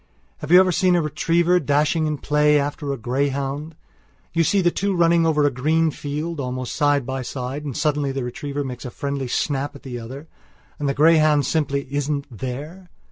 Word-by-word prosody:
Have 150 - -7
you 180 +2 +8
ever 185 -1 +4
seen 180 +1 +3
a 175 - +3
retriever 170 +4 +2
dashing 150 +2 +1
in 150 -1 -2
play 150 +1 +3
after 145 0 -3
a 140 - -3
greyhound? 140 +5 -2 0.6
You 165 0 +3
see 200 +5 +2
the 175 -2 +3
two 200 +1 -1
running 170 -1 +3
over 150 -2 +2
a 145 - +3
green 155 +5 +1
field, 150 +3 -4
almost 130 -1 -4
side 145 -3 +2
by 130 +1 -3
side, 130 +3 -5
and 140 -5 -4
suddenly 145 -2 0
the 135 -1 -3
retriever 140 +4 -4
makes 130 -2 -6
a 125 - -5
friendly 140 +1 -4
snap 140 +3 -1
at 140 - -13
the 125 -3 -6
other. 130 +7 -9 0.5
And 145 -1 -1
the 140 - -1
greyhound 155 -1 +4
simply 140 -2 0
isn't 145 0 -1
there. 150 - -7
145 Hz, 190 wpm, -22 LUFS, 135-160 Hz, 0.6 s, you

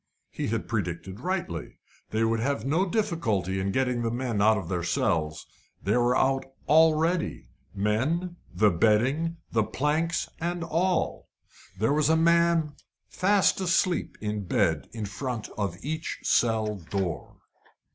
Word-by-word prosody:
He - - -3
had 110 +1 -2
predicted 95 -2 -3
rightly. 175 - -3 0.3
They 110 +1 0
would 115 0 +1
have 130 -1 -1
no 170 +7 +1
difficulty 115 - 0
in 95 +1 -1
getting 125 +1 0
the 115 - 0
men 120 -3 -1
out 110 +1 +5
of 95 -5 -5
their 90 0 -1
cells: 80 -2 -1 0.4
they 100 - +1
were 120 0 +3
out 135 0 +2 0.2
already 160 - +3 0.3
men, 140 - 0 0.2
and 100 -6 +3
bedding, 135 - +2 0.2
and 110 -1 +1
planks, 155 +4 0
and 175 +1 -2
all. 170 +2 0 0.5
There 110 +8 +2
was 150 0 +2
a 160 - +4
man 170 -2 +3 0.4
fast 195 0 +2
asleep 185 -1 +1
in 105 -1 -3
bed 90 -5 +1
in 110 -2 -5
front 120 +2 -4
of 100 -4 -2
each 155 +3 -4
cell 110 -3 +2
door. 90 0 -4
120 Hz, 140 wpm, -27 LUFS, 105-165 Hz, 0.5 s, out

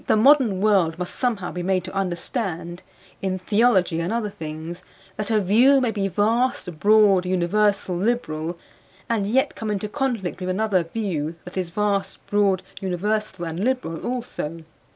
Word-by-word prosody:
The - - +4
modern 240 -5 +5
world 190 -6 +3
must 180 0 -5
somehow 220 -8 -1
be 180 - -4
made 185 0 0
to 185 - -8
understand 180 - -3 0.4
(in 190 -1 -1
theology 190 -3 +2
and 170 +2 -2
other 225 -3 -1
things) 160 +1 -7 0.3
that 210 -1 -4
a 220 -1 +3
view 235 +8 +5
may 250 -3 +1
be 200 -3 -1
vast, 210 -4 0
broad, 205 -2 +5
universal, 185 +1 +1
liberal 175 -6 -1 0.5
and 215 -4 0
yet 260 +5 +2
come 220 - -4
into 210 0 -2
conflict 235 -7 -2
with 185 0 -3
another 195 0 +1
view 165 -5 -3
that 180 - -10
is 185 -2 -2
vast, 200 +2 -1
broad, 200 -2 +2 0.2
universal 190 0 -2
and 165 +1 -4
liberal 250 -10 -1
also. 200 -10 -4
195 Hz, 155 wpm, -23 LUFS, 175-220 Hz, 0.5 s, modern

